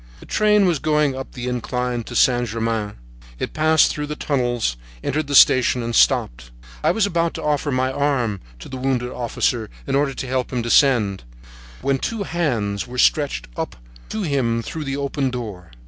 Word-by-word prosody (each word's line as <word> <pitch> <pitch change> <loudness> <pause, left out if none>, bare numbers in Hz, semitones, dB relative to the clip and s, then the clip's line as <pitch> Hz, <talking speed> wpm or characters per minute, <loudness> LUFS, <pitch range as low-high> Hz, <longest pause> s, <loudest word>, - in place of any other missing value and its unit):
The - - -13
train 210 -1 +3
was 170 -5 +2
going 150 -2 +1
up 135 0 -7
the 125 0 -5
incline 125 0 -2
to 120 - -8
Saint 120 0 +3
Germain. 110 -2 -2 0.4
It - - -4
passed 155 0 +4
through 150 0 -4
the 150 - -4
tunnels, 120 - -1 0.3
entered 155 +1 -1
the 140 - -1
station, 125 -2 +6
and 115 0 -3
stopped. - - +2 0.3
I - - +4
was 220 -2 +2
about 170 -3 0
to - - -5
offer 150 -1 0
my 130 0 +1
arm 130 -8 0 0.2
to - - -9
the 130 - -6
wounded 125 -1 -1
officer, 120 -2 -1 0.2
in 135 - -3
order 140 -1 +1
to 130 - -5
help 130 0 -1
him 125 -2 -1
descend, 115 - +3 0.6
when 135 -1 +1
two 225 +5 -2
hands 120 - -1
were 125 +1 -8
stretched 135 - +2
up - - -4 0.3
to 215 - -3
him 120 -7 0
through 155 +4 -5
the 135 0 -2
open 140 -1 -1
door. 105 -8 -6
130 Hz, 185 wpm, -21 LUFS, 120-145 Hz, 0.6 s, station